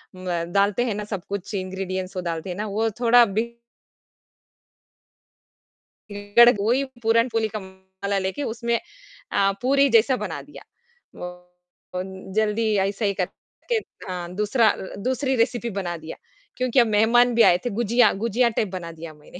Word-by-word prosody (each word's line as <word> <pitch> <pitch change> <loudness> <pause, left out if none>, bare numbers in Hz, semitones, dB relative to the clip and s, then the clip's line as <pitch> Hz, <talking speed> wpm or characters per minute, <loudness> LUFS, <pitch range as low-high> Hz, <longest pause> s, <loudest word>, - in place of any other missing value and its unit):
म 180 -2 -3
डालते 200 +3 +2
हैं 225 - -1
ना 210 - -4
सब 195 -4 -3
कुछ 200 +1 -5
इंग्रीडिएंट्स 185 0 -4
वो - - -1
डालते 170 +1 -4
हैं 180 - -4
ना 210 - -2
वो 220 +3 0
थोड़ा 240 0 +6 2.7
बिगड़ 205 +4 +3
गई। 245 - +3
वो 225 - +2
ही 265 +2 +2 0.2
पूरनपोली 225 0 +2
का 215 0 -5
मसाला 190 +1 -5
लेके 190 +10 -3
उसमें 235 0 -1 0.6
अ, 195 0 +3
पूरी 275 +2 +3
जैसा 235 +2 +4
बना - - -5
दिया। - - -13 0.6
वो 180 0 -5 0.6
बन 190 +1 -6
जल्दी 220 0 +1
अइसे 195 +3 0
ही 200 - +1
करके 195 - -5 0.3
हाँ, 180 -1 -5
दूसरा 215 +2 +2
अ - - +2
अ, 190 - -8
दूसरी 260 +1 0
रेसपी 235 0 0
बना 185 -5 -3
दिया 160 0 -8 0.4
क्योंकि 255 0 +2
अब 235 - +5
मेहमान 230 +3 +4
भी 235 - +5
आए 175 - +6
थे। - - +1
गुझिया 235 +1 +3
गुझिया 235 +2 +2
टाइप 220 -1 -1
बना 175 -3 -6
दिया 165 -1 -9
मैंने 150 +4 -14
210 Hz, 165 wpm, -23 LUFS, 190-235 Hz, 2.7 s, थोड़ा